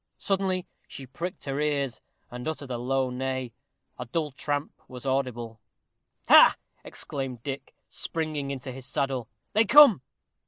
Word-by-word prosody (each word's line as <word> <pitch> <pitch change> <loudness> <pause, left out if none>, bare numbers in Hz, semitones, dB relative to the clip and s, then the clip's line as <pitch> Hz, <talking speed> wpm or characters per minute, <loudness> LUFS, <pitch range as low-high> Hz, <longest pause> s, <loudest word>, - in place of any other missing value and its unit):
Suddenly 190 -2 0 0.2
she 135 - -8
pricked 175 - -6
her 140 0 -2
ears, 145 -4 -1 0.3
and 125 +2 -6
uttered 145 -4 -4
a 120 - -2
low 130 +1 0
neigh. 130 -1 -3 0.5
A 125 - -5
dull 150 +4 -2
tramp 145 +2 -3
was 125 +1 -10
audible. 120 -4 -2 0.7
"Ha!" - - +9 0.3
exclaimed 130 -4 -5
Dick, 140 -1 -6
springing 155 -4 -3
into 135 -1 -5
his 130 0 -8
saddle; 135 -4 -2 0.2
"they 220 - +5
come." 270 - +8
135 Hz, 135 wpm, -27 LUFS, 125-150 Hz, 0.7 s, Ha